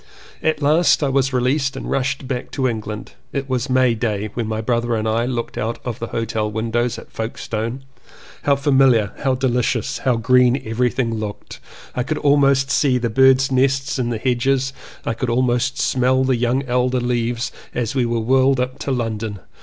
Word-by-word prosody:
At 155 -2 0
last 155 +2 +4
I 140 - +1
was 135 0 +1
released 135 +2 0
and - - -6
rushed 130 0 -1
back 125 -2 -3
to 130 -2 +1
England. 110 -2 -5 0.2
It 140 -1 -3
was 130 0 -1
May 130 -2 +3
Day 110 -2 -2
when 120 -2 -3
my 110 0 -2
brother 120 +1 0
and 110 0 -1
I 115 +2 +1
looked 120 -2 -3
out 115 +2 -2
of 120 -4 -4
the 115 - -4
hotel 110 -2 -2
windows 115 +2 -1
at - - -12
Folkestone. 115 +2 -4 0.6
How 140 - +3
familiar, 135 -6 +3
how 135 -3 +1
delicious, 125 -3 0
how 130 -2 +1
green 125 +3 +3
everything 120 +1 0
looked, 110 -2 -6 0.3
I 125 - -1
could 150 +5 -2
almost 140 -1 +3
see 135 -3 +3
the 120 -2 -2
birds' 130 +2 +4
nests 135 +1 +1
in 120 -2 0
the 115 - -1
hedges, 130 +3 0 0.3
could 115 +2 -2
almost 125 +1 +1
smell 130 +1 +2
the 130 -1 +2
young 120 +3 0
elder 125 0 +1
leaves 120 0 -1 0.2
as 120 -3 -1
we 130 -3 +1
were 115 0 0
whirled 130 +3 +3
up 130 +1 -2
to 140 - -3
London. 110 -4 -2
125 Hz, 180 wpm, -20 LUFS, 115-135 Hz, 0.6 s, last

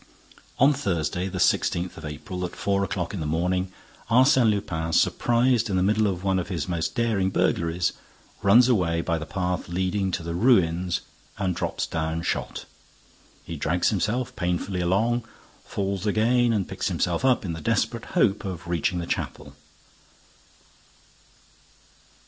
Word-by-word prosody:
On 140 +3 +5
Thursday 90 - -1
the 95 -1 -5
sixteenth 90 0 +1
of 80 - -11
April, 75 +5 -6
at 90 - -4
four 100 0 0
o'clock 90 -2 -3
in 100 - -4
the 75 - -3
morning, 90 +4 0 0.4
Arsène 130 0 +5
Lupin, 85 -6 -2
surprised 120 +2 +2
in 95 - 0
the 90 - +2
middle 105 +2 +2
of 90 -2 -3
one 95 -1 +1
of 90 - -4
his 85 -6 -3
most 85 -2 -2
daring 110 -5 +1
burglaries, 85 -2 0 0.5
runs 115 +5 +6
away 85 -9 +2
by 85 -1 -1
the 80 - -7
path 90 -1 -2
leading 95 +2 0
to 85 - -3
the 85 0 -4
ruins 90 -4 +2 0.4
and 95 -3 -1
drops - - -2
down 80 +1 -2
shot. - - -3 0.8
He 85 - -6
drags 85 +3 +1
himself 110 +5 -1
painfully 90 +1 -1
along, 110 +7 +1 0.4
falls 100 0 -3
again 120 +3 +3
and 105 -5 0
picks - - -3
himself - - -1
up 130 -5 +3
in 85 - -3
the 80 - -6
desperate - - 0
hope 100 +3 +3
of 90 -4 -6
reaching 85 +1 0
the 85 - -3
chapel. - - -4
95 Hz, 155 wpm, -25 LUFS, 85-105 Hz, 0.8 s, runs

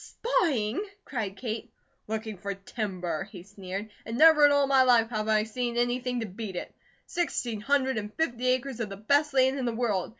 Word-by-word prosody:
"Spying?" 285 - 0 0.2
cried 210 -7 -4
Kate. 225 0 -4 0.4
"Looking 220 0 -4
for 200 +2 -5
timber," 195 -4 -4
he 180 -4 -10
sneered. 200 +1 -7
"And 230 +1 -5
never 310 -1 +8
in - - +3
all 285 0 +4
my 270 -1 +4
life 240 -3 +4
have 215 -1 -2
I 215 -1 +3
seen 240 +2 -3
anything 245 0 0
to - - -2
beat 200 -1 -7
it. - - -5 0.3
Sixteen 245 -10 -2
hundred 265 0 +1
and 210 0 -6
fifty 255 -6 -1
acres 255 0 0
of 225 -3 -2
the 195 - -7
best 285 +8 +2
land 265 0 +3
in 255 - -2
the 235 -2 -1
world. 215 -6 0
230 Hz, 195 wpm, -28 LUFS, 210-260 Hz, 0.4 s, never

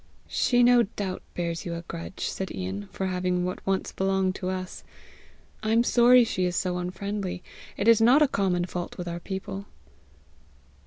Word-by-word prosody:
"She 245 -1 +2
no 245 0 +6
doubt 195 -3 -3
bears 170 -1 -2
you 170 -1 -4
a 170 - -6
grudge," 170 +2 -6
said 190 -1 -3
Ian, 95 +2 -5
"for 190 - -3
having 180 -1 0
what 180 - -4
once 195 -1 0
belonged 190 -1 0
to 185 - -3
us. 185 0 -5 0.8
I 215 0 0
am 230 +1 +4
sorry 245 +1 +6
she 185 -5 -1
is 180 0 -1
so 180 0 -1
unfriendly. 185 +1 -4 0.3
It 205 - -1
is 230 -1 +6
not 255 +7 +6
a - - +4
common 185 -7 0
fault 175 -1 -5
with 175 - -5
our 170 0 -4
people." 195 +2 -6
185 Hz, 175 wpm, -26 LUFS, 180-210 Hz, 0.8 s, no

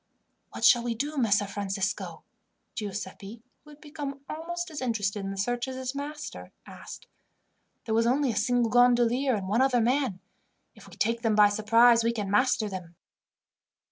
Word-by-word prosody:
"What - - -3
shall 240 - +6
we 235 -1 -2
do, 290 +6 -3
Messer 210 -6 +2
Francisco?" 195 -1 -4 0.5
Giuseppi, 205 +1 -7 0.2
who 300 - -17
had 295 0 -15
become 290 -2 -7
almost 345 +2 -5
as 300 - -6
interested 210 -5 -2
in 195 - -4
the 195 - -6
search 240 +5 -1
as 260 - -5
his 260 0 -4
master, 295 +2 -7
asked. - - -11 0.8
"There 220 - -2
was 230 +1 +2
only 265 +1 +2
a - - -6
single 240 +1 +1
gondolier 245 +1 +3
and 195 -3 -4
one 220 +6 +1
other 265 -2 +3
man. 245 -4 0 0.5
If - - -16
we - - -14
take 230 +1 0
them 225 -3 +1
by 210 -1 +6
surprise 230 +3 +4
we 230 +1 +1
can 205 -4 -4
master 220 0 +2
them." 185 -4 -8
235 Hz, 175 wpm, -27 LUFS, 210-260 Hz, 0.8 s, shall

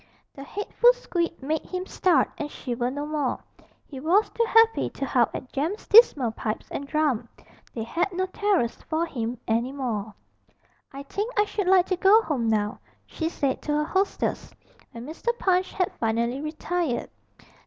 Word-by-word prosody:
The 275 - -9
hateful 415 - +2
squeak 340 - -3
made 310 +3 -1
him 365 0 -5
start 350 -8 +2
and 295 - -3
shiver 245 -3 -3
no 285 +3 -4
more; 295 -3 -2 0.4
he 270 - -9
was 355 +9 +2
too 465 - +1
happy 450 0 +4
to 275 - -5
howl 245 -2 +2
at 260 - -8
Jem's 320 +10 -2
dismal 300 - +6
pipes 220 -1 -4
and 280 - -5
drum: 275 -7 0 0.5
they 225 - -3
had 335 - -1
no 370 +1 -1
terrors 375 - 0 0.2
for 320 +1 +1
him 240 -6 -4
any 235 +3 0
more. 230 -7 -3 0.8
'I 275 +1 -8
think 415 - -3
I 415 - +5
should 410 -2 -3
like 370 -1 +5
to 370 - -1
go 405 +5 +6
home 265 - -1
now,' 210 -1 0 0.3
she 320 -1 -3
said 275 -5 -1
to 295 - -2
her 300 0 +1
hostess, 390 +4 -1 0.4
when 235 +1 -9
Mr. 410 - -3
Punch 370 -3 +1
had 365 -2 -1
finally 235 +4 0
retired. 310 -2 -2
305 Hz, 170 wpm, -25 LUFS, 250-375 Hz, 0.8 s, dismal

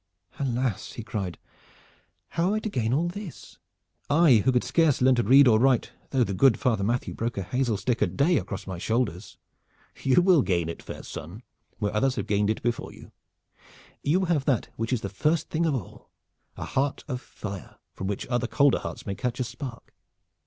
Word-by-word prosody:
"Alas!" 125 -5 -1
he 115 - -6
cried. 105 -6 -4 0.9
"How 170 +2 0
am 200 - +1
I - - +1
to 220 - -3
gain 120 - -1
all 155 +7 +2
this? 180 -1 -8 0.5
I, 150 -4 +6
who 130 - +3
could 125 -1 +2
scarce 160 -5 +2
learn 130 +1 +5
to 120 - +2
read 130 +5 +7
or 110 -2 +5
write 130 -1 +3 0.2
though 130 -2 +2
the 100 - -2
good 130 +5 +4
Father 110 -6 +1
Matthew 120 +5 -1
broke 115 0 -3
a 100 - -1
hazel 120 +2 0
stick 115 +5 -1
a - - +4
day 155 +4 +2
across 95 -2 -4
my 95 -2 -6
shoulders?" 110 -3 -2 0.6
"You 135 +6 +4
will 180 -5 +5
gain 85 -7 0
it, 85 - -6
fair - - -8
son, 90 - -8 0.3
where 105 -1 -2
others 130 +4 +2
have 105 - -2
gained 105 0 +1
it 110 - -1
before 120 0 -2
you. - - -14 0.9
You 180 +6 +2
have 160 -6 +1
that 130 -7 +1
which 115 +2 -3
is 125 -4 0
the 100 - -3
first 150 +11 0
thing 165 +1 +1
of 150 - +1
all, 115 -9 -8 0.5
a - - -4
heart 135 +1 -1
of 125 -3 -4
fire 100 -7 -8 0.2
from 95 - -5
which 100 -1 -3
other 120 -1 -1
colder 140 +1 +3
hearts - - -7
may 100 - -2
catch 125 +5 -3
a - - +2
spark. 125 -1 -8
125 Hz, 200 wpm, -26 LUFS, 105-140 Hz, 0.9 s, read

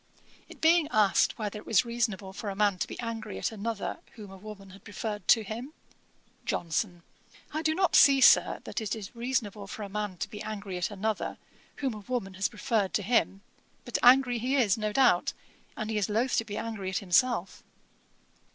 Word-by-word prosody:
It - - -14
being 330 -1 +5
asked 210 - +3
whether 210 -1 -4
it - - -14
was 220 +2 +3
reasonable 220 -5 -2
for 205 +1 -5
a 195 - -4
man 200 -2 +2
to - - -1
be - - -8
angry 225 -3 -5
at - - -2
another 220 0 -4 0.2
whom 210 -3 -10
a - - -10
woman 200 -1 -11
had 195 +1 -15
preferred 210 -1 -5
to 225 - +5
him; 235 +8 -7 0.7
JOHNSON. 175 +1 -2 0.5
'I 310 - -1
do 315 0 +1
not 370 -1 +2
see, 275 -1 +7
Sir, - - +5
that - - -4
it 215 -1 -2
is 215 0 -9
reasonable 230 -5 -2
for 210 - -7
a 200 - -6
man 205 -2 -4
to - - -3
be 210 - -9
angry 205 -3 -5
at 175 - -1
another, 210 +1 -3 0.4
whom 270 -4 -2
a 215 - -7
woman 205 -2 -4
has 190 +1 -1
preferred 215 -3 -1
to 205 - 0
him: 200 -2 +1 0.4
but 245 - -2
angry 245 -1 +6
he 255 +4 0
is, 225 -8 +3
no 215 -1 -2
doubt; 245 -7 +3 0.4
and 215 0 -3
he 215 - 0
is 200 - -1
loath 230 +5 +1
to 225 - +1
be 205 -1 -6
angry 215 -5 -4
at 190 - -1
himself.' 200 +1 +1
215 Hz, 200 wpm, -29 LUFS, 200-240 Hz, 0.7 s, see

